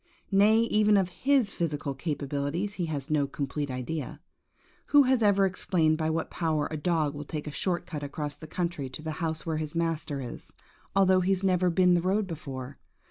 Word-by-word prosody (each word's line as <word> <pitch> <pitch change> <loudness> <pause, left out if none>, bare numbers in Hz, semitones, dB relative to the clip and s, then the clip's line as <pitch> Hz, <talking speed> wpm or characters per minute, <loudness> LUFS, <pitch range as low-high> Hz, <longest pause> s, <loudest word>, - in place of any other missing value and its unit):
Nay, 210 +3 +5
even 210 -2 +3
of 190 -2 +2
his 260 +2 +2
physica1 145 -5 -3
capabilities 150 +5 -2
he 175 -4 -2
has 145 -2 -4
no 145 -2 +2
complete 145 +1 -3
idea. 130 +3 -4 0.7
Who 290 -1 +7
has 260 -2 +2
ever 200 -2 +4
explained 170 -4 +1
by 160 0 0
what 160 0 -2
power 155 -3 0
a - - -2
dog 155 -2 0
will 145 0 -6
take 150 +1 -5
a 150 - -5
short 175 +3 -1
cut 155 -4 -5
across 145 0 -4
the 155 +2 -11
country 170 -4 -3
to 140 +4 -8
the 160 - -3
house 160 -1 -2
where 160 -2 -1
his 155 0 -4
master 165 -3 -1
is, 125 -3 -8 0.4
although 190 -1 +5
he 190 +2 +2
has 190 0 -2
never 185 -1 +3
been 180 +1 +4
the 175 - +3
road 195 +4 +1
before? 140 -6 -7
165 Hz, 195 wpm, -28 LUFS, 145-185 Hz, 0.7 s, Who